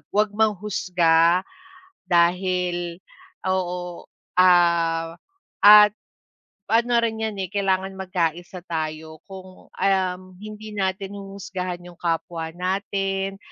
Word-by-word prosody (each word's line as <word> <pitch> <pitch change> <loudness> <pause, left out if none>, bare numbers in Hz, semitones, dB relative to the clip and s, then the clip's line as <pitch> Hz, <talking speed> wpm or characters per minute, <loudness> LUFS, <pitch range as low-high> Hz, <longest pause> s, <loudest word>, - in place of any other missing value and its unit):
'wag 210 0 +3
mang 215 0 +2
manghusga 175 -3 +2 0.7
dahil 175 0 +1 0.5
oo 180 -2 -3 0.3
ah, 170 -2 +3 0.5
at 210 0 +9 0.8
ano 235 +1 +3
rin 225 -1 -1
'yan 220 -1 -2
eh 185 - -4
kailangan 190 -1 -1
magkaisa 180 -1 -3
tayo 160 -1 -5
kung 185 -1 -12
um, 185 -2 0 0.2
hindi 215 0 -9
natin 195 0 -2
huhusgahan 185 -2 -6
'yong 175 -1 -13
kapwa 165 -1 -2
natin, 195 +1 -2
185 Hz, 100 wpm, -23 LUFS, 175-195 Hz, 0.8 s, at